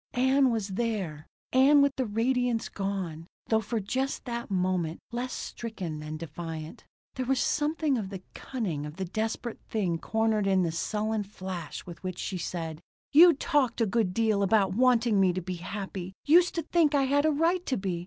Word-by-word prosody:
Ann 260 +2 +4
was 220 -4 -1
there. 190 -8 -3 0.3
Ann 280 +3 +6
with 280 -1 +2
the 260 -3 -1
radiance 235 +2 0
gone; 185 -5 -4 0.2
though, 220 -1 +3
for 225 +2 -2
just 260 +7 -2
that 235 -1 -4
moment, 180 -3 0
less 245 +2 -3
stricken 185 -9 -5
than 155 +1 -6
defiant. 160 0 -7 0.3
There 260 - -3
was 270 0 +2
something 300 -3 +1
of 195 -3 -4
the 190 -2 -7
cunning 175 - -4
of 150 - -9
the 190 +1 -3
desperate 220 +5 -3
thing 180 -7 0
cornered 220 -1 +1
in 190 -1 +3
the 165 - 0
sullen 215 +5 -1
flash 185 -5 -6
with 175 -1 -10
which 185 -1 -4
she 185 - -3
said: 165 -2 -4 0.3
"You 335 +4 +9
talked 280 -5 +1
a 230 - +3
good 215 -2 +1
deal 215 0 +1
about 200 -1 +3
wanting 235 -2 +3
me 185 -2 +4
to 185 - -2
be 180 0 -5
happy. 190 0 -6
Used 345 +4 +5
to 335 - -1
think 310 -2 +2
I 275 - +4
had 285 +2 +2
a - - +4
right 335 +4 +1
to 260 - 0
be. 190 -3 -2
215 Hz, 185 wpm, -28 LUFS, 185-255 Hz, 0.3 s, You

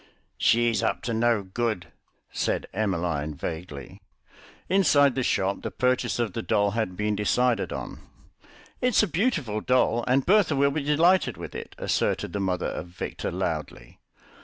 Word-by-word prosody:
"She's 120 0 +3
up - - -1
to 115 - -2
no 115 -2 +2
good," 105 -1 -3 0.4
said - - -1
Emmeline 85 -7 -1
vaguely. 80 -2 -7 0.7
Inside 145 -8 +4
the 130 - -1
shop 100 -5 0
the - - -3
purchase 125 0 0
of 115 -5 -1
the 115 - -3
doll 100 -2 +1
had 105 -5 -2
been 105 0 0
decided 115 +2 +1
on. - - -6 0.8
"It's 250 -3 +3
a - - +1
beautiful 160 - -1
doll, 125 -1 +2
and 130 +1 +2
Bertha 190 -6 +4
will 140 +1 +3
be 155 +2 -2
delighted 165 +6 +3
with - - -8
it," - - -8
asserted - - -1
the 100 - -2
mother 95 -2 -1
of 85 - -5
Victor 85 - -5
loudly. - - -4
115 Hz, 155 wpm, -26 LUFS, 95-140 Hz, 0.8 s, Inside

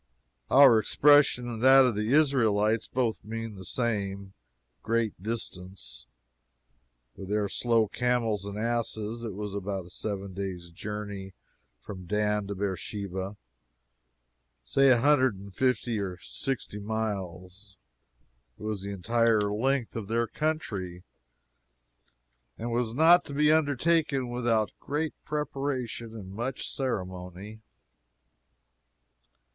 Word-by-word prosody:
Our 135 -5 +8
expression 140 +1 +4
and 115 -2 -5
that 135 +1 +8
of 125 -4 +1
the 105 +3 -1
Israelites 115 -7 +3
both 120 -3 -1
mean 115 +1 -5
the 95 -2 -10
same 100 -3 -2 0.5
great 115 -4 -1
distance. 95 - -6 1.1
With 95 -1 -9
their 105 0 +1
slow 115 +2 +2
camels 115 -2 0
and 100 0 -6
asses, 115 0 -2
it 110 -5 -5
was 105 -1 -5
about 100 -2 -3
a - - -13
seven 100 -1 -4
days' 90 -3 -5
journey 100 0 -6 0.5
from 95 +6 -9
Dan 105 +1 0
to 100 - -4
Beersheba 95 0 -4 1.3
say 135 - +4
a 125 - +6
hundred 130 -2 +4
and 100 0 -11
fifty 120 -1 0
or 95 -3 -4
sixty 120 0 -4
miles 100 -2 -5 0.8
it - - -11
was 105 -2 -3
the 100 - -5
entire 115 +3 +2
length 130 +2 0
of 110 -3 -4
their 115 +2 +1
country, 100 - -3 1.5
and 120 +2 -4
was 115 -1 -1
not 165 +4 +6
to 140 - -7
be 150 +1 +4
undertaken 150 -2 +2
without 120 -3 +1
great 150 +2 -2
preparation 135 -6 -3
and 95 -4 -8
much 120 +5 -3
ceremony. 95 -3 -4
110 Hz, 120 wpm, -28 LUFS, 100-125 Hz, 1.5 s, Our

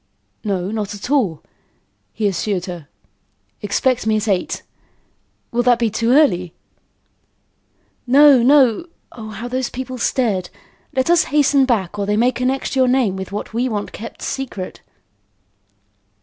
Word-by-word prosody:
"No, 195 -3 -2
not 215 -2 -3
at 205 +6 -7
all," 210 - +1 0.7
he 215 - -1
assured 190 -1 -2
her. 175 -5 -8 0.7
"Expect 225 +4 0
me 215 -1 +3
at 215 +1 -2
eight. 190 -3 -1 0.9
Will 240 - +1
that 245 -1 +4
be 230 -2 0
too 230 +2 -1
early?" 195 - +3 1.5
"No, 275 0 +7
no. 265 +2 +4 0.2
Oh, 220 -2 -9
how 220 +3 -6
those 255 0 -2
people 255 0 -6
stared! 205 -9 0 0.5
Let 260 +5 +2
us 345 - +4
hasten 285 -2 +3
back 205 -6 -1
or 200 - -2
they 210 0 +1
may 245 +3 +3
connect 260 +2 -2
your 260 -1 +3
name 250 -6 +2
with 190 0 -6
what 210 +2 -5
we 245 +3 0
want 205 -3 -3
kept 230 +2 -9
secret." 235 -9 -5
230 Hz, 145 wpm, -19 LUFS, 200-260 Hz, 1.5 s, No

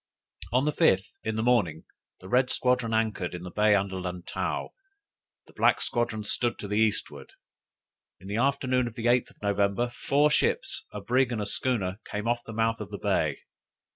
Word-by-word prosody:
"On 130 +3 +2
the 150 - +2
fifth, 95 - +2
in 110 0 -2
the 110 - -1
morning, 100 -11 +2 0.4
the 95 - -10
red 125 +5 +3
squadron 125 -2 +1
anchored 110 -5 -1
in 90 +1 -7
a 90 - -7
bay 105 0 +4
under 95 -1 -1
Lantow; 90 -1 -3 0.8
the - - -20
black - - +3
squadron 120 -3 -1
stood 120 +3 0
to 105 - -6
the 105 +1 0
eastward. 110 -2 0 0.9
In 95 - -12
the 100 +2 -2
afternoon 130 -1 +1
of 115 - -8
the 115 - -5
8th 120 0 +3
of - - -24
November, 100 +3 +1
four 145 +4 +2
ships, - - +1
a 105 - -6
brig, 125 +4 +2
and 115 - -2
a 105 - -2
schooner 100 -4 -1
came 105 +1 -4
off 120 0 0
the - - -9
mouth 115 +1 0
of 105 - -6
the - - -6
bay. - - 0
110 Hz, 190 wpm, -27 LUFS, 100-125 Hz, 0.9 s, bay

